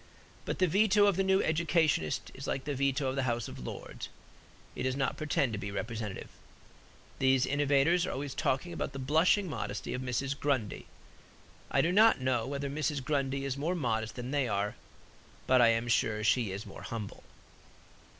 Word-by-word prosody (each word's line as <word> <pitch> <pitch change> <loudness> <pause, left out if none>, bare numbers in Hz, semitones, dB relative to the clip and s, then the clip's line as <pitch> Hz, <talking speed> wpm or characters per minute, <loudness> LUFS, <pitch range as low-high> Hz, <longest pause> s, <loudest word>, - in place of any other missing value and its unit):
But - - -2
the 185 - +3
veto 205 +3 +4
of 200 -3 +3
the 195 - +1
new 190 0 +3
educationist 160 - +1
is - - -8
like 130 - -2
the 145 - -3
veto 140 0 0
of 130 - -1
the 135 - 0
House 120 -1 -1
of - - -9
Lords; - - -7 0.7
it - - -5
does 130 0 0
not 135 0 0
pretend 140 -5 0
to 105 - -3
be 100 - -4
representative. 110 0 -5 0.9
These 130 -1 +3
innovators 145 +5 +2
are - - -2
always 140 0 -4
talking 155 +7 -1
about 145 - -4
the - - -6
blushing 160 +9 +3
modesty 155 - -4
of 125 - -3
Mrs. 135 +2 -2
Grundy. 130 -8 -1 0.8
I - - +3
do 170 - +1
not 220 +1 +6
know 130 -3 0
whether 140 0 -3
Mrs. 145 -1 -2
Grundy 135 -1 -1
is 135 -1 -2
more 165 +6 -1
modest 110 -8 -1
than 125 +1 -5
they 140 -3 +1
are; 100 -1 -1 0.7
but 130 -1 +5
I 120 - +7
am 115 +1 +2
sure 110 -2 +1
she 115 -2 +2
is 100 +2 -5
more - - -10
humble. 110 -3 -6
135 Hz, 185 wpm, -31 LUFS, 120-155 Hz, 0.9 s, I